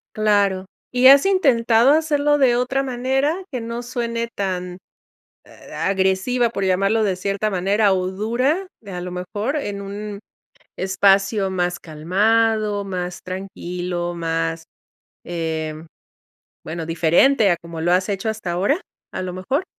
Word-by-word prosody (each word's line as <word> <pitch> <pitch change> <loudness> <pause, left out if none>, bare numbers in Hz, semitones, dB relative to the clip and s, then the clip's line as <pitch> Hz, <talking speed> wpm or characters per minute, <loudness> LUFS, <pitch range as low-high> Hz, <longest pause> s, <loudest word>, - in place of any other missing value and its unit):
Claro. 205 -3 +2 0.3
¿Y 250 +1 +5
has 275 +3 +8
intentado 250 - +4
hacerlo 295 -1 +2
de 260 -4 +4
otra 250 +2 0
manera 265 +4 0 0.2
que 250 -3 -3
no 230 +1 -5
suene 235 -1 -3
tan, 180 -2 -3 0.7
ah, - - -6
agresiva, 195 +6 +1
por 200 -4 -3
llamarlo 195 +4 +2
de 195 -3 +1
cierta 200 +3 -1
manera, 200 +2 +2
o 185 -1 0
dura? 250 - 0
De 200 -3 -10
a 180 -1 -5
lo 180 0 -6
mejor 205 +9 -3
en 205 -9 -3
un 200 +1 -6 0.6
espacio 195 +1 +2
más 180 -1 -1
calmado, 210 +6 +1
más 180 -2 -4
tranquilo, 180 -2 -4
más, 165 0 -2 0.6
eh, 160 -2 -3 0.9
bueno, 165 +1 -5
diferente 175 - +3
a 175 - +3
como 170 -1 -8
lo 175 +2 +1
has 185 +2 +2
hecho 200 +1 -2
hasta 220 -5 -3
ahora. 200 - +1 0.3
A - - -4
lo 185 -1 -4
mejor. 260 - -2
200 Hz, 140 wpm, -21 LUFS, 180-235 Hz, 0.9 s, has